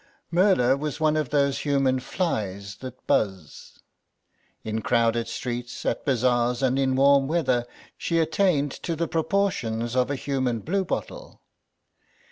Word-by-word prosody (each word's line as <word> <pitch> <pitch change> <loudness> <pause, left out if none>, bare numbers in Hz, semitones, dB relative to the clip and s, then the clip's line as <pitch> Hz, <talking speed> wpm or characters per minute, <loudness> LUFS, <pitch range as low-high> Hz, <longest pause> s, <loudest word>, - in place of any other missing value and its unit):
Merla 175 -8 +4
was 150 0 -4
one 155 -1 +2
of 155 -4 -1
those 140 -1 +1
human 135 -3 +1
flies 100 - -3
that 130 +1 -10
buzz; 95 -7 -2 0.9
in 110 0 -3
crowded 115 0 +1
streets, 120 -1 -5
at - - -1
bazaars 125 -1 +1
and 130 +1 +2
in 130 -1 +1
warm 140 0 +4
weather, 130 -7 +1 0.3
she 170 - 0
attained 160 -3 +2
to 165 +4 -4
the 165 +1 -1
proportions 155 - -1
of 125 0 +2
a 145 - -1
human 130 -4 -1
bluebottle. 190 - -3
130 Hz, 130 wpm, -25 LUFS, 120-155 Hz, 0.9 s, Merla